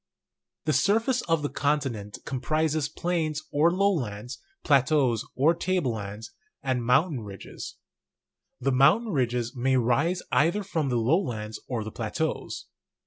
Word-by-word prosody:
The 155 - +2
surface 225 - +2
of 165 -2 +2
the 145 - 0
continent 135 -9 -1
comprises 155 +3 0
plains 155 -2 -1
or 155 +4 +4
low 200 +2 +3
lands, 120 - -4 0.2
plateaus 135 -5 +3
or 150 +6 +4
table 175 -5 0
lands, 105 +2 -6 0.3
and 130 -3 0
mountain 140 +4 +3
ridges. 100 -3 -8 0.8
The 135 +2 +1
mountain 155 - +4
ridges 125 -4 0
may 130 +1 +2
rise 140 +9 +1
either 165 +11 +3
from 160 -7 -1
the 125 - +1
lowlands 115 - 0
or 120 -4 -2
the 110 - -6
plateaus. - - -3
140 Hz, 135 wpm, -27 LUFS, 120-165 Hz, 0.8 s, or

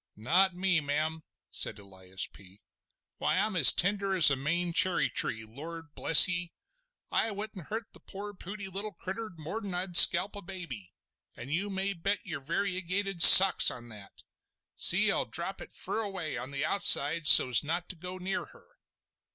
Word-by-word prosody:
"Not 175 - -1
me, 180 -2 -2
ma'am," 155 +3 -5 0.3
said - - -1
Elias 95 -2 -9
P. 95 0 -17 0.6
"Why, - - -3
I'm 210 +1 -3
as 160 -7 +7
tender 195 +1 -2
as 165 -5 +6
a - - 0
Maine 170 +6 -5
cherry 185 +1 -1
tree. 110 -1 -2
Lor, 160 +9 -12
bless 165 - +6
ye. 175 -2 -6 0.6
I 225 - -2
wouldn't 205 -4 -10
hurt 225 +2 -7
the - - -12
poor 205 +1 -11
pooty 195 +1 -10
little 200 +3 -8
critter 215 +5 -9
more'n 190 +5 -8
I'd 180 0 -7
scalp 185 +4 +6
a 205 - -10
baby. 170 - -11 0.4
An' 120 +3 -12
you 180 +7 -4
may 195 +1 -4
bet 200 +3 -4
your 170 -6 -8
variegated 185 +3 -5
socks 190 +3 +9
on 120 -1 -11
that! 105 -3 -16 0.5
See, - - +2
I'll - - -3
drop - - -7
it - - -13
fur - - -7
away 190 -9 -7
on 125 +2 -8
the 140 +1 -4
outside 160 -3 +1
so's 125 -1 +6
not 170 +4 -6
to - - -9
go 180 +2 -11
near 190 +3 -6
her!" - - -22
175 Hz, 170 wpm, -27 LUFS, 145-195 Hz, 0.6 s, socks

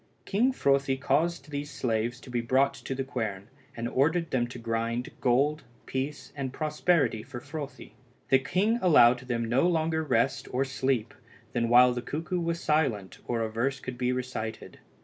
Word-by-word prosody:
King 235 +7 +2
Frothi 140 - +2
caused 150 +2 0
these 145 0 -4
slaves 115 -1 -1
to 130 - -11
be 120 -1 0
brought 130 +4 +2
to 135 - -6
the 135 - -2
quern, 110 -6 -4 0.3
and 115 +1 -2
ordered 160 +6 +1
them 120 -2 +1
to 125 - -9
grind 115 +1 -2
gold, 140 +5 +2 0.2
peace, 135 +3 -4
and 135 -3 -3
prosperity 150 -4 +1
for 125 +1 -8
Frothi. 145 +1 -7 0.4
The 135 - +6
king 205 - +1
allowed 125 -9 +6
them 120 -2 -2
no 125 +8 +2
longer 160 -2 +1
rest 140 -2 +1
or 130 +2 +1
sleep 130 -3 -1 0.4
than 115 -1 0
while 125 +1 +7
the 120 - -3
cuckoo 165 +7 -3
was 170 0 -1
silent 135 - 0
or 120 -1 0
a 110 - -3
verse 130 +5 -1
could 130 -2 -7
be 125 0 +1
recited. 125 -4 -5
130 Hz, 170 wpm, -28 LUFS, 120-150 Hz, 0.4 s, while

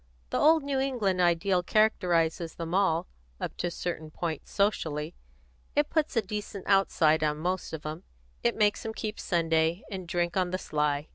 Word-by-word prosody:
The - - +1
old 320 -1 +5
New 280 -1 -1
England 225 -9 0
ideal 175 +2 +3
characterises 175 -5 +2
them 165 0 -5
all, 185 -3 +2 0.3
up - - -4
to - - -1
a - - -1
certain 165 -2 -4
point, 160 -1 -4
socially; 160 -6 0 0.6
it 295 0 +2
puts 310 -6 0
a 225 - +3
decent 205 -1 -5
outside 160 -5 +3
on 150 -1 +1
most 180 +3 -2
of 160 -2 -6
'em; 155 +3 -5 0.4
it 235 - +1
makes 210 -1 +2
'em 220 0 -5
keep 215 -1 -4
Sunday, 165 0 +1
and 185 -3 -5
drink 175 0 -1
on 185 -2 +1
the 185 - -1
sly. 150 -3 -1
180 Hz, 180 wpm, -28 LUFS, 160-205 Hz, 0.6 s, old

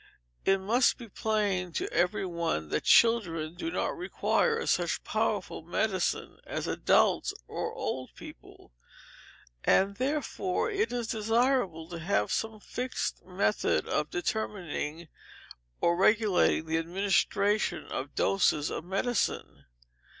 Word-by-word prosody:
It 195 0 +4
must 225 +7 +2
be 235 - -9
plain 200 -4 -1
to - - -1
every 175 +3 +1
one 170 - -2
that - - -1
children 170 -9 +4
do 330 - -4
not - - -1
require 455 +5 0
such 175 -1 0
powerful 215 -5 -1
medicine 185 +3 -1
as - - -4
adults - - +2
or - - -3
old 130 0 -4
people, - - -13 0.9
and 200 +1 +3
therefore 265 - -1
it 410 +2 0
is 240 -1 -2
desirable 225 -6 +1
to 170 -1 -6
have 165 - 0
some 220 -1 -2
fixed 250 +4 -4
method - - 0
of - - -1
determining 190 - -3 0.7
or 170 - +3
regulating 195 -4 +3
the 160 0 0
administration 195 +4 +1
of 135 +2 -5
doses 160 -6 +2
of - - -4
medicine. 195 +6 -2
195 Hz, 120 wpm, -29 LUFS, 170-230 Hz, 0.9 s, It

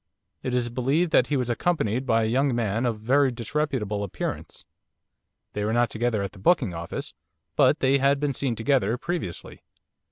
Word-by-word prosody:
'It 130 - -3
is 120 -1 0
believed 135 +8 0
that 125 - +4
he 145 - 0
was 125 -2 -1
accompanied 125 -2 0
by 115 -1 +3
a - - +1
young 130 +3 +1
man 115 +1 0
of 110 -3 -2
very 135 +5 +3
disreputable 120 -4 -2
appearance. 100 -3 -5 0.9
They 105 - -2
were 110 +2 0
not 120 -1 +2
together 115 -2 0
at 100 - -4
the 100 - -15
booking 120 - +2
office, 85 0 -6 0.4
but - - +4
they 135 +1 +3
had 140 +1 +3
been 145 -1 0
seen 130 -2 -2
together 115 -1 +1
previously. 160 - -5
120 Hz, 180 wpm, -25 LUFS, 110-140 Hz, 0.9 s, that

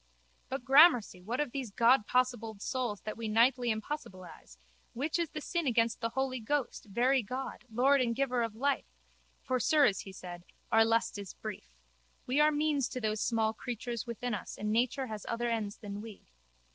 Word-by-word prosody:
But, 260 -2 -4
gramercy, 270 - +6
what 230 +7 -3
of 295 -4 -1
those 265 -3 -4
Godpossibled 235 -1 +2
souls 245 -3 -2
that 215 - -6
we 230 -1 -4
nightly 240 +3 +3
impossibilise, 210 - -6 0.4
which 300 +7 -1
is 335 -2 0
the 305 - -6
sin 340 0 -2
against 230 -2 +1
the 230 - 0
Holy 260 +1 -2
Ghost, 260 +2 -2
Very 250 +6 +2
God, 255 +4 -6
Lord 265 +4 +4
and 235 -2 0
Giver 255 -2 0
of 230 -2 -2
Life? 275 +4 0 0.6
For, 255 0 0
sirs, 290 - +4
he 195 - -7
said, 175 -2 -9 0.3
our 225 0 +6
lust 225 -2 +1
is 200 -2 -8
brief. - - -7 0.6
We 260 +4 +1
are 300 0 +6
means 295 -3 +1
to 255 - -4
those 215 -2 -1
small 220 -2 +1
creatures 240 0 -5
within 235 +1 -3
us 200 - -5
and 210 +1 -2
nature 245 +4 +1
has 215 -4 -6
other 235 +1 -1
ends 215 -3 -2
than 205 -1 -7
we. 220 -2 -10
235 Hz, 180 wpm, -31 LUFS, 220-265 Hz, 0.6 s, gramercy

